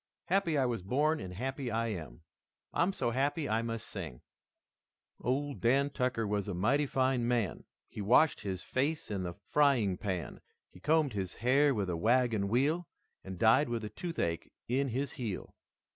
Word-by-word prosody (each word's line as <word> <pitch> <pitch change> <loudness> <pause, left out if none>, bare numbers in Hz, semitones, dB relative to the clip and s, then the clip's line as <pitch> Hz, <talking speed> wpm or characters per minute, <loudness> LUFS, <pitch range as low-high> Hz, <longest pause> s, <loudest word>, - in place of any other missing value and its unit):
Happy 175 -4 +1
I 135 - +3
was 120 -5 -1
born 150 - +1
and 90 - -6
happy 135 +4 -3
I 115 0 0
am. 80 - -6 0.5
I'm 175 +3 +2
so 120 -10 -1
happy 140 +5 0
I 110 +1 +1
must 115 -1 -4
sing: - - -7 1.0
"Ol 140 +4 -1
Dan 135 +4 +2
Tucker 125 -4 0
was 105 -1 -1
a 100 - -3
mighty 135 +11 +2
fine 130 -2 +1
man, 120 -6 0 0.2
He - - -7
washed 125 +10 +4
his 95 -2 -4
face 145 0 -1
in 100 -2 -1
the 90 -2 -4 0.2
frying 125 -11 +3
pan, 90 - -4 0.3
He - - -15
combed 150 - +2
his 95 -3 -3
hair 135 +4 +3
with 100 -3 -1
a 90 - -1
wagon 115 0 +2
wheel 145 - +1 0.4
And 95 -1 -7
died 115 +8 +4
with 115 -2 -2
a - - -5
toothache 105 - -3 0.2
in 135 +3 +1
his 135 +3 -2
heel." 110 -7 -5
120 Hz, 175 wpm, -32 LUFS, 100-140 Hz, 1.0 s, washed